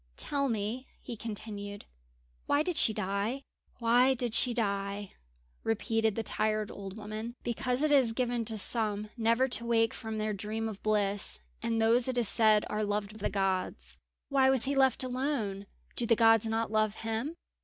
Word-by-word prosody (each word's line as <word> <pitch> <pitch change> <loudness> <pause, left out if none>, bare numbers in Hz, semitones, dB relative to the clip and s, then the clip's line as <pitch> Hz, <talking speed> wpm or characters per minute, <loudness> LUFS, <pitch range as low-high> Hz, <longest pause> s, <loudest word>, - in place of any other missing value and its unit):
"Tell 280 -2 0
me," 225 +4 -3
he 240 - -7
continued, 205 -2 -7 0.6
"why 290 +1 +2
did 355 +1 -2
she 225 - +5
die?" 210 +6 -2 0.3
"Why 245 +3 +3
did 240 -2 -3
she 245 +2 +5
die?" 200 -3 -2 0.5
repeated 225 -1 0
the 225 - -2
tired 215 -1 -1
old 195 0 -8
woman. 215 +2 -6
"Because 250 +3 -1
it 310 - +2
is 265 -5 +5
given 240 -1 -1
to 220 0 0
some 210 -1 +3
never 230 +2 +2
to 235 -1 +4
wake 225 -1 +2
from 220 -2 -6
their 215 0 -1
dream 215 +3 -4
of 210 -3 -7
bliss, 205 -2 +1 0.2
and 230 -1 -1
those 230 +3 +4
it 255 -1 -2
is 235 -3 +3
said 215 -1 +4
are 215 - -2
loved 205 0 -2
of 215 - -13
the 210 - -1
gods." 195 -2 -2 0.3
"Why 270 -2 +4
was 265 -3 +4
he 275 - 0
left 265 -2 +3
alone? 250 -7 -3 0.3
Do 235 - -1
the 230 - +4
gods 225 -1 +4
not 225 0 -1
love 215 -1 +1
him?" 225 +8 -3
225 Hz, 175 wpm, -30 LUFS, 210-245 Hz, 0.6 s, she